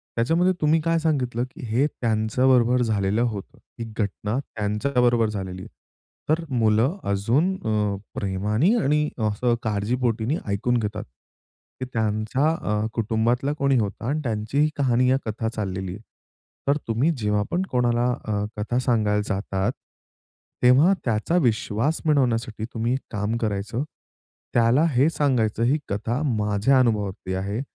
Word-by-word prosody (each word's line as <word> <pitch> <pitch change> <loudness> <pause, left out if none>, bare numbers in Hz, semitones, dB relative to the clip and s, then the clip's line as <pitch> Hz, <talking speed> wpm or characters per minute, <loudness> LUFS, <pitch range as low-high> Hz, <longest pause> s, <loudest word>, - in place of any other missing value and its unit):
त्याच्यामध्ये 165 +10 +2
तुम्ही 155 +1 +4
काय 165 0 +2
सांगितलं 130 -7 0
की - - -9
हे 120 +6 +2
त्यांच्याबरोबर 120 +1 +2
झालेलं 105 -1 +1
होतं. 110 -5 -3 0.2
ही 115 - -3
घटना 105 +2 -2
त्यांच्याबरोबर 120 0 +1
झालेली 95 -3 -5
आहे. - - -10 0.6
तर 160 +2 +2
मुलं 115 - +2
अजून 120 - +2
अ, 105 - -1 0.2
प्रेमाने 105 - +1
आणि 150 +2 +2 0.2
असं 120 +3 +1
काळजीपोटीनी 115 +4 0
ऐकून 105 +5 0
घेतात. 105 -3 -3 0.8
की 130 - -3
त्यांच्या 110 +5 0 0.2
अ, 105 +1 0
कुटुंबातला 115 +5 0
कोणी 140 -2 +2
होता 105 -1 -2
आणि 150 +3 0
त्यांची 110 +2 -3
ही 150 - +4
कहाणी 125 -2 +2
या 130 - +4
कथा 110 +1 -3
चाललेली 95 -4 -4
आहे. 105 - -10 0.7
तर 140 +1 +3
तुम्ही 115 +8 +1
जेव्हा 105 -2 0
पण 175 - +1
कोणाला 120 -1 +2 0.2
अ, 105 -1 -1
कथा 110 +4 -1
सांगायला 110 -5 +1
जातात, 95 -1 -1 0.9
तेव्हा 135 +10 +6
त्याचा 115 +9 +1
विश्वास 120 +1 +1
बनवण्यासाठी 115 -7 +1
तुम्ही 115 +1 0
एक 130 - 0
काम 105 +1 -1
करायचं. 110 +3 -2 0.7
त्याला 120 +5 +4
हे 135 +6 +4
सांगायचं 120 -8 +1
ही 130 +6 +3
कथा 115 +6 -2
माझ्या 110 +1 +2
अनुभवातील 105 -6 0
आहे 100 +4 -3
115 Hz, 135 wpm, -24 LUFS, 105-130 Hz, 0.9 s, तेव्हा